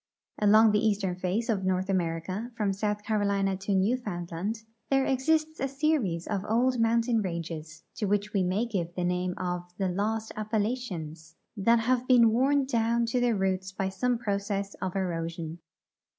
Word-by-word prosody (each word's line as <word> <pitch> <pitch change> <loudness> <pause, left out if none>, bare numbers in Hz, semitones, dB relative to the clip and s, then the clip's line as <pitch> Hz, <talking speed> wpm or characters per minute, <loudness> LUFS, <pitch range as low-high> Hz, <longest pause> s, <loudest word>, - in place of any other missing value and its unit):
Along 215 +1 +6
the 210 +1 +2
eastern 200 -4 +1
face 185 +6 -1
of 210 -5 0
North 185 0 0
America, 185 +4 -2
from 205 -2 +1
South 210 +1 -2
Carolina 200 -3 +1
to 195 +1 -1
Newfoundland, 200 -1 -1 0.3
there 270 -1 +3
exists 310 +4 +1
a 270 - 0
series 270 - 0
of 200 -3 -2
old 245 +2 +2
mountain 230 0 +2
ranges, 165 -3 -5
to 210 - -1
which 205 +1 0
we 200 - +2
may 185 +5 +1
give 180 -7 -3
the 180 - -2
name 180 0 -1
of 180 -1 -2 0.2
the 190 -2 0
Lost 215 +4 -1
Appalachians, 205 -8 -3 0.2
that 230 +3 +3
have 250 +2 +1
been 235 -3 +6
worn 270 +4 +3
down 235 -2 +1
to 235 +2 0
their 245 -2 +2
roots 190 -1 -1
by 190 0 -2
some 245 +5 0
j^rocess 200 -3 -2
of 185 0 -3
erosion. 165 -3 -3
205 Hz, 165 wpm, -28 LUFS, 185-230 Hz, 0.3 s, Along